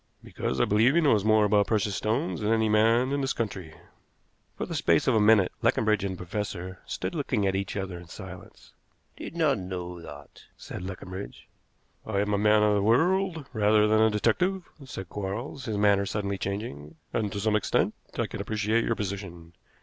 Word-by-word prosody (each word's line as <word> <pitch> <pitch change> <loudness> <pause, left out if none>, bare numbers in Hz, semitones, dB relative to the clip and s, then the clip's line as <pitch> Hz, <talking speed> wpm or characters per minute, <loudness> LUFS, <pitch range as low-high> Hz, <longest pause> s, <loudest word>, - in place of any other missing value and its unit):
"Because 65 - -3
I - - +4
believe 115 +8 +3
he 170 - +5
knows 115 -10 +3
more 110 0 +4
about 105 0 +3
precious 105 -2 0
stones 115 - -1
than 105 +1 0
any 110 -1 +3
man 115 +4 +3
in 140 0 0
this 135 0 0
country." 95 -8 -4 0.8
For - - -2
the - - -6
space 85 -2 +2
of 130 - +3
a 110 - +4
minute 105 -3 +5
Leconbridge 110 -2 +2
and 95 -1 -2
the - - -12
professor 95 0 -5
stood - - -4
looking 135 -9 -1
at 95 0 +1
each 95 +1 -3
other 95 -3 -4
in 85 - -13
silence. 90 0 -11 0.5
"I - - -6
did - - -8
not 150 -8 +2
know 90 -2 -6
that," 75 -3 -12 0.2
said - - -8
Leconbridge. 95 +1 -8 0.6
"I 105 -3 -2
am 105 +1 0
a 100 - +1
man 105 0 +4
of 105 0 +4
the 100 - +2
world 165 - +2
rather 105 -1 +4
than 110 +1 +3
a 110 - +5
detective," 145 - +1 0.2
said 95 -7 -7
Quarles, 105 - -5
his 110 -3 -2
manner 100 -1 +3
suddenly 100 -2 -2
changing, 100 -8 -5 0.2
"and 105 -3 -1
to 100 - -4
some 105 +1 +1
extent 105 - +1 0.2
I - - +1
can - - -6
appreciate 110 +1 0
your 115 - 0
position. 95 -5 -6
105 Hz, 195 wpm, -27 LUFS, 95-110 Hz, 0.8 s, he